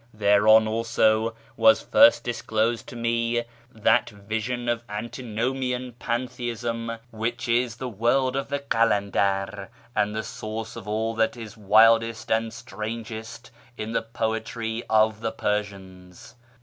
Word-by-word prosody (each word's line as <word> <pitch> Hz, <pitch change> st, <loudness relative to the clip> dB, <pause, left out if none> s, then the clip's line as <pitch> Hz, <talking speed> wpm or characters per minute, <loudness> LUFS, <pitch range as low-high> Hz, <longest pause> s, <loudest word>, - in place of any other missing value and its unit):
Thereon, 105 Hz, +1 st, +5 dB
also, 115 Hz, 0 st, +1 dB, 0.2 s
was 275 Hz, -, +5 dB
first 285 Hz, +1 st, +6 dB
disclosed 115 Hz, -1 st, -1 dB
to -, -, -9 dB
me 115 Hz, 0 st, 0 dB, 0.3 s
that 110 Hz, -3 st, +2 dB
vision 110 Hz, +4 st, -4 dB
of 120 Hz, -1 st, 0 dB
anti 110 Hz, +5 st, -5 dB
nomian 125 Hz, +2 st, -2 dB
pantheism 120 Hz, -1 st, -3 dB
which 115 Hz, +3 st, -3 dB
is 120 Hz, 0 st, +1 dB
the 130 Hz, +1 st, -5 dB
World 125 Hz, +4 st, +1 dB
of 135 Hz, -, -2 dB
the 140 Hz, -, -1 dB
Kalandar, 100 Hz, -6 st, 0 dB, 0.3 s
and 105 Hz, 0 st, +1 dB
the 110 Hz, -, -2 dB
source 110 Hz, +1 st, -6 dB
of 115 Hz, -3 st, -9 dB
all 110 Hz, +2 st, -1 dB
that 115 Hz, +1 st, 0 dB
is 110 Hz, -3 st, -9 dB
wildest 115 Hz, +2 st, +4 dB
and 110 Hz, 0 st, +1 dB
strangest 110 Hz, +2 st, -7 dB, 0.3 s
in 110 Hz, +1 st, -4 dB
the -, -, 0 dB
poetry 115 Hz, 0 st, -3 dB
of 110 Hz, -1 st, +3 dB
the 115 Hz, -1 st, -1 dB
Persians. 100 Hz, -1 st, -5 dB
115 Hz, 130 wpm, -25 LUFS, 110-120 Hz, 0.3 s, first